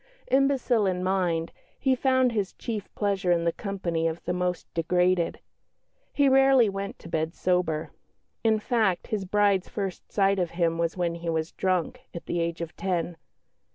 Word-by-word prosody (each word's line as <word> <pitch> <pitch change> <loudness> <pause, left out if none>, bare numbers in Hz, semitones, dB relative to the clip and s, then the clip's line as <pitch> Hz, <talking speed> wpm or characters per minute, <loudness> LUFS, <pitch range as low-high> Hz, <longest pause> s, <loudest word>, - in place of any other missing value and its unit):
Imbecile 265 -5 +3
in 180 -1 -1
mind, 180 -3 0 0.3
he 265 -1 +2
found 260 -1 +3
his 205 -4 -2
chief 215 -4 -5
pleasure 195 -3 0
in 170 -1 +2
the 170 - +2
company 170 -4 -2
of 165 +1 -3
the 175 - 0
most 180 0 -1
degraded. 180 +1 +1 0.7
He 285 -1 +3
rarely 270 -3 +6
went 195 0 -5
to - - -13
bed 160 0 -2
sober 180 -4 0 0.5
in 220 -1 +4
fact, 215 -5 +1
his 205 -3 -2
bride's 200 -1 +2
first 195 -3 -5
sight 195 -1 +2
of 175 -2 0
him 165 -1 +1
was 170 +1 -1
when 175 -2 0
he 170 0 -5
was 160 0 -1
drunk, 190 +7 -1
at 170 - -7
the 175 - -2
age 170 0 -2
of 170 -1 -6
ten. 175 -3 -2
185 Hz, 170 wpm, -27 LUFS, 170-210 Hz, 0.7 s, rarely